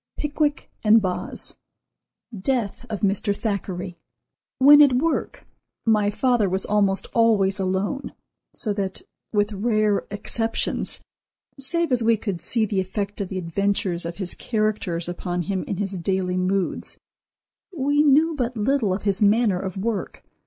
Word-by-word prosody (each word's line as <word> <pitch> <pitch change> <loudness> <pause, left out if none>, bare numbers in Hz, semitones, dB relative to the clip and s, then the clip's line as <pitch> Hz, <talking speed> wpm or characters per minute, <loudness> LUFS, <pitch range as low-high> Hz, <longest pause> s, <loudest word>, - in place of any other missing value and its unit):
—"Pickwick" 295 0 -1
and 220 +1 +6
"Boz."—Death 215 +4 -5
of 215 -3 -4
Mr. 200 0 +1
Thackeray. 185 -4 -4 0.6
When 290 +3 +8
at 285 -3 +6
work 315 +6 -1 0.4
my 215 -2 +3
father 240 -2 +2
was 190 +1 +1
almost 200 -2 +1
always 210 -4 +3
alone, 190 +8 -2 0.4
so 210 - -1
that, 195 -2 -3 0.3
with 210 0 +1
rare 215 0 +1
exceptions, 225 +2 -2 0.6
save 330 +4 0
as 250 -1 +4
we 225 0 +3
could 200 -5 -4
see 230 -2 +1
the 200 -2 -1
effect 200 +2 -4
of 195 - -2
the 190 - -5
adventures 185 0 -1
of 170 +1 -5
his 190 -3 -3
characters 215 -7 -1
upon 175 0 -3
him 190 +2 -2
in 195 - -4
his 195 -2 -3
daily 185 0 -1
moods, 185 +1 -1 0.7
we 290 -3 +1
knew 305 +3 +4
but 250 -4 -2
little 220 -3 +1
of 200 - -6
his 200 -1 0
manner 210 -2 +3
of 190 0 -5
work. 210 +1 -3
205 Hz, 140 wpm, -23 LUFS, 190-235 Hz, 0.7 s, When